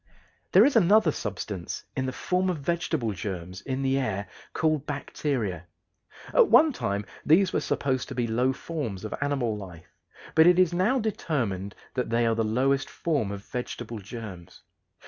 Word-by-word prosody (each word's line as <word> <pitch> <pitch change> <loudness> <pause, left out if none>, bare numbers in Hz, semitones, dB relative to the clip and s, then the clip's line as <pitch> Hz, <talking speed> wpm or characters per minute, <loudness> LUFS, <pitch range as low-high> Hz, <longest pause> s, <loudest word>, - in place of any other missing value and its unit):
There - - +7
is 285 - +2
another 205 -4 +5
substance 100 - -5
in 130 0 -1
the - - -1
form 185 +7 0
of 180 - -1
vegetable 150 -5 -1
germs 90 -1 -5
in 135 0 -3
the 135 0 +2
air 100 -6 -2 0.2
called 155 -2 0
bacteria. 125 - -3 0.7
At 485 -4 +6
one 310 -5 +6
time 100 - -2 0.2
these 185 +4 +4
were - - +2
supposed 130 -2 -1
to 135 - -7
be 120 -1 0
low 120 +3 +1
forms 130 - -5
of 110 - -4
animal 135 -6 0
life, 90 -3 -10 0.4
but 160 +1 +6
it 180 0 +6
is 180 -2 +4
now 190 +9 +2
determined 125 - -2 0.2
that 125 -3 -2
they 115 +1 +2
are 115 - +3
the 115 0 0
lowest 135 +5 +1
forms 145 -12 -1
of 100 0 -6
vegetable 120 -2 -5
germs. 100 -5 -9
130 Hz, 165 wpm, -27 LUFS, 105-160 Hz, 0.7 s, There